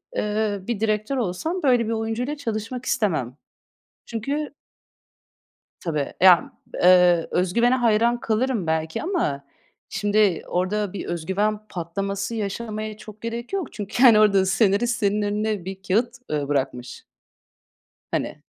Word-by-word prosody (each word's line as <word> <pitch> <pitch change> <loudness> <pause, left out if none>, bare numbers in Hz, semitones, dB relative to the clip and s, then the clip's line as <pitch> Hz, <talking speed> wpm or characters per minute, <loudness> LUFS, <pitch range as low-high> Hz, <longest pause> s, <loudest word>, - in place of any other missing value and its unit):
eee, 210 -1 -1
bir 235 -4 -2
direktör 215 +4 0
olsam 255 - -2
böyle 245 -4 +3
bir - - -1
oyuncuyla 225 +6 -2
çalışmak 240 -1 -4
istemem. 155 - -1 0.7
Çünkü 280 +7 -3 1.3
Tabii. 150 -5 -2
Ya, 180 -2 +6 0.3
eee, 180 -2 +5
özgüvene 235 +8 +2
hayran 235 -1 +2
kalırım 225 -3 0
belki 160 0 -1
ama 310 - -1 0.4
şimdi 205 -3 +1
orada 190 +2 -1
bir 200 - -5
özgüven 190 +6 -1
patlaması 195 +5 -3
yaşamaya 215 0 -4
çok 215 0 -13
gerek 230 +4 -5
yok 385 -6 -3
çünkü 210 +3 -3
hani 235 -5 +8
orada 200 -3 +4
senarist 215 +4 +2
senin 210 0 +1
önüne 210 -1 -1
bir 190 +1 -6
kâğıt, 225 +6 +1 0.2
ııı, 145 -2 -1
bırakmış. 135 -3 -3 1.1
Hani, - - -3
210 Hz, 125 wpm, -23 LUFS, 185-235 Hz, 1.3 s, hani